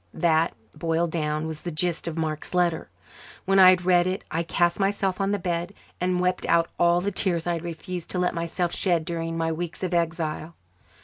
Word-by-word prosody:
That, 165 -1 +2 0.2
boiled 165 0 0
down, 155 -1 -1
was 160 -1 -5
the 175 - -4
gist 170 +1 -1
of 165 -1 -4
Mark's 155 +1 -3
letter. 175 -2 +1 0.6
When 195 +1 +4
I 185 -1 +10
had 180 -1 +3
read 180 -1 +4
it 185 +1 -2
I 165 - 0
cast 170 +2 +1
myself 195 -1 0
on 195 - +1
the 205 - +1
bed 175 +1 -3 0.2
and 180 0 0
wept 180 0 0
out 170 0 +3
all 175 0 +4
the 200 +2 -1
tears 175 -3 0
I 175 - +1
had 165 -1 -4
refused 175 +1 -6
to - - -3
let 180 0 +1
myself 170 +1 -2
shed 170 -4 +1
during 165 0 -3
my 165 0 0
weeks 170 +3 -5
of 185 -1 -1
exile. 165 -1 -1
170 Hz, 205 wpm, -25 LUFS, 165-180 Hz, 0.6 s, I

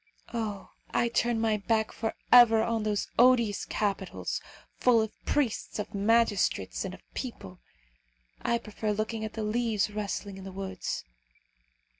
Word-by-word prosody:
Oh! 215 -4 -4 0.2
I 235 - +1
turn 235 0 +1
my 220 -1 +2
back 220 +1 0
for 225 -1 -3 0.2
ever 225 -3 +8
on 230 -1 0
those 210 -1 -1
odious 235 -4 +4
capitals, 195 -3 -2 0.4
full 245 -2 +5
of 220 -1 0
priests, 275 -7 0
of 210 - -4
magistrates, 210 0 +2
and - - -5
of - - -22
people. 225 -8 -6 0.8
I 235 - +1
prefer 215 -1 -3
looking 215 +1 -2
at 220 - -4
the 220 - -3
leaves 215 -1 0
rustling 205 -1 -4
in - - -9
the 190 - -7
woods. 190 -1 -4
220 Hz, 145 wpm, -29 LUFS, 205-230 Hz, 0.8 s, ever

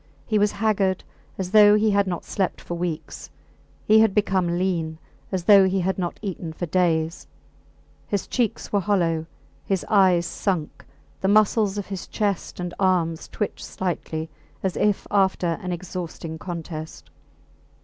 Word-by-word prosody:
He 215 -1 +1
was 205 0 +2
haggard, 200 -3 +1 0.3
as 185 -1 -4
though 210 -1 +8
he 215 0 +3
had 200 -1 +2
not 175 -2 -3
slept 190 -3 -1
for - - -7
weeks; 170 -2 -4 0.6
he 215 +1 +6
had 220 -3 +4
become 185 -4 +1
lean, 170 -4 -1 0.3
as 185 -2 -1
though 195 0 +7
he 190 0 0
had 190 +2 -1
not 175 -2 -2
eaten 175 -5 -4
for 175 - -4
days. 165 -1 0 0.8
His 200 -2 -1
cheeks 235 -4 -2
were 205 - +4
hollow, 170 -5 0 0.4
his 190 -2 -1
eyes 185 -4 +4
sunk, 175 -4 -3 0.3
the 190 - 0
muscles 210 0 +3
of 205 - -3
his 195 -3 -6
chest 205 -5 -2
and 175 -1 -4
arms 175 -4 +1
twitched 210 - -4
slightly 165 -3 -3 0.4
as 190 -2 -1
if 210 -2 +1
after 190 -4 +2
an 180 -2 -4
exhausting 170 -2 -6
contest. 165 -3 -7
185 Hz, 150 wpm, -24 LUFS, 170-200 Hz, 0.8 s, though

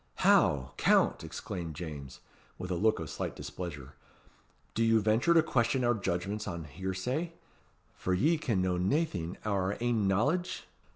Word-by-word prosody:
"How! 65 -3 +4
Count!" - - +3
exclaimed 85 -4 -5
James, 75 -5 -7 0.4
with 90 - -5
a - - +1
look 110 +5 +3
of 80 - -5
slight - - -4
displeasure. 75 -6 -7 0.8
"Do 115 - +1
you 115 0 +4
venture 110 +11 +3
to 165 - +6
question 125 -4 +1
our 120 0 +4
judgments 100 +1 -2
on 85 -4 -4
hearsay 95 - -3 0.6
for 95 - -1
ye 155 - +2
can 110 -11 0
know 90 -1 0
naething 95 - 0
o' 105 - 0
your 95 +1 0
ain 115 -4 +1
knowledge?" 145 - +1
100 Hz, 155 wpm, -31 LUFS, 90-120 Hz, 0.8 s, to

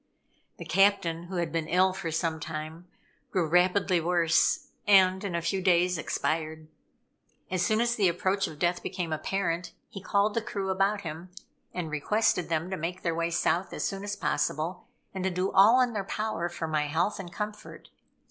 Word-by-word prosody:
The - - -8
captain, 185 -4 +2
who 185 +2 -7
had 170 -3 -1
been 160 -1 -2
ill 185 +2 +3
for 190 -3 -4
some 160 0 -1
time, 160 +2 -6 0.4
grew 180 -3 +1
rapidly 180 +1 +3
worse, 170 -1 +2 0.2
and 190 -1 +5
in 190 -4 -3
a 170 - -2
few 190 +3 -1
days 180 -2 +3
expired. 155 0 -2 0.8
As 185 -1 +1
soon 215 +4 +2
as 235 0 +2
the 205 -5 +2
approach 190 +3 0
of 155 - -9
death 175 +2 0
became 175 -4 -3
apparent, 175 +1 -2 0.2
he 195 - -8
called 200 +2 +1
the 230 - 0
crew 200 -4 -3
about 195 +2 +1
him, 165 0 -7 0.4
and 170 -4 -4
requested 180 +3 +1
them 165 +2 -1
to 190 - -2
make 175 +3 -4
their 170 - 0
way 165 +1 -1
south 175 +2 0
as - - -3
soon 195 0 -3
as 205 0 -3
possible, 160 +3 -2 0.3
and 190 -1 -4
to 190 - +1
do 185 +1 -1
all 220 +6 +6
in 245 -2 +1
their 205 -2 -2
power 195 -4 -2
for 170 -1 -5
my 155 -1 0
health 165 +8 0
and 175 -3 -7
comfort. 210 +3 -7
180 Hz, 185 wpm, -28 LUFS, 165-195 Hz, 0.8 s, all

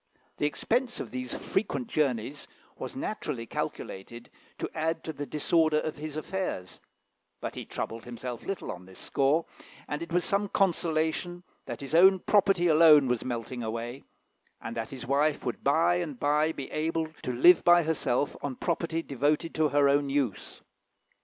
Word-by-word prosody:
The 145 - +1
expense 240 - -1
of 115 - -6
these 125 0 -4
frequent 220 +5 -2
journeys 140 - -1 0.3
was - - -7
naturally 150 - -3
calculated 115 +1 -6 0.3
to - - -3
add 160 +1 -1
to 160 - -4
the 145 -1 -6
disorder 155 +2 +2
of 155 0 -2
his 155 0 -6
affairs; 155 - -4 0.6
but - - -4
he - - -6
troubled 115 0 -5
himself 120 0 -6
little 195 - -4
on 90 -1 -10
this 95 - -13
score, 145 +4 +1 0.4
and 150 +2 -3
it 170 - -6
was 175 +1 +1
some 200 0 +1
consolation 175 -1 0 0.2
that - - -5
his 140 +2 -7
own 190 +3 +7
property 195 -2 +3
alone 155 -4 +7
was 125 -2 0
melting 120 0 -4
away, 115 +3 -4 0.6
and 115 +1 -6
that 115 -1 -3
his 130 -3 -7
wife 145 +3 +1
would 120 - -3
by 160 +5 +3
and 155 -8 -4
by 150 +2 +2
be 140 -4 -7
able 160 +1 -1
to - - -3
live 170 +9 +6
by 175 0 +6
herself 145 -4 0
on 140 -2 -3
property 165 0 -1
devoted 150 +4 0
to 155 -1 +2
her 145 -1 +4
own 140 0 +2
use. 135 -7 -2
150 Hz, 165 wpm, -28 LUFS, 125-170 Hz, 0.6 s, own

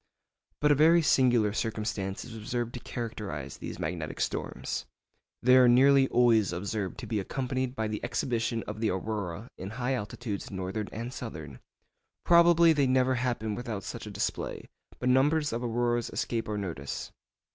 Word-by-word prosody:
But 150 0 +4
a 145 0 +3
very 165 +1 +6
singular 120 -7 +3
circumstance 105 -3 -3
is 120 -2 -9
observed 120 +2 -3
to 125 - -5
characterise 105 - -5
these - - -6
magnetic - - -4
storms. - - -3 0.6
They 125 +1 +6
are 125 -1 +7
nearly 135 +2 +6
always 115 -5 +4
observed 100 +2 -3
to - - -6
be 110 -3 -1
accompanied 130 +4 -2
by 110 -3 -1
the 105 0 -4
exhibition 115 -2 -1
of 105 +1 -7
the 110 -1 +1
aurora 100 +1 -4
in 95 - -5
high 125 +3 -1
latitudes, 105 0 -5
northern 95 +2 -4
and 120 +3 -5
southern. 80 - -7 0.7
Probably 170 -1 +6
they 140 -3 +2
never 130 0 +3
happen 120 -4 -1
without 110 -3 -4
such - - -6
a - - -5
display, - - -3 0.3
but 125 - -3
numbers 145 +4 +3
of 120 +1 -2
auroras 120 0 0
escape 115 -2 -2
our 105 - -2
notice. 80 -9 -5
115 Hz, 160 wpm, -29 LUFS, 105-130 Hz, 0.7 s, are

